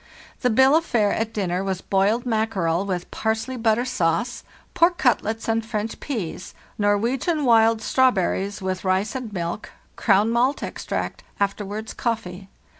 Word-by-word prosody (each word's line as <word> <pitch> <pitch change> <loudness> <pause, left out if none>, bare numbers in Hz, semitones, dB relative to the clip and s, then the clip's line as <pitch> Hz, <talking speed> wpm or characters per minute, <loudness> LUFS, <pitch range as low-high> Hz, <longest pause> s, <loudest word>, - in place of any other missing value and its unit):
"The 250 - +1
bill 265 +5 +5
of 325 - +3
fare 215 -9 +1
at 225 0 -2
dinner 190 -3 -1
was 190 -2 -2
boiled 200 +5 +1
mackerel, 200 -6 0
with 180 -2 -3
parsely 220 +4 -2
butter 230 0 +1
sauce; 240 +1 -1 0.3
pork 345 +1 +3
cutlets 225 -3 +1
and 225 0 +1
French 220 -1 -4
pease; 210 - -5 0.2
Nor 205 0 +3
wegian 270 - 0
wild 225 -1 +4
strawberries, 205 -5 +1
with 185 0 -2
rice 190 +2 0
and 255 -4 -5
milk; 175 +1 -4 0.3
Crown 210 +1 +3
malt 250 +4 +1
extract; - - -4 0.2
afterwards 205 +2 -2
coffee. 195 -5 -3
220 Hz, 145 wpm, -23 LUFS, 195-240 Hz, 0.3 s, bill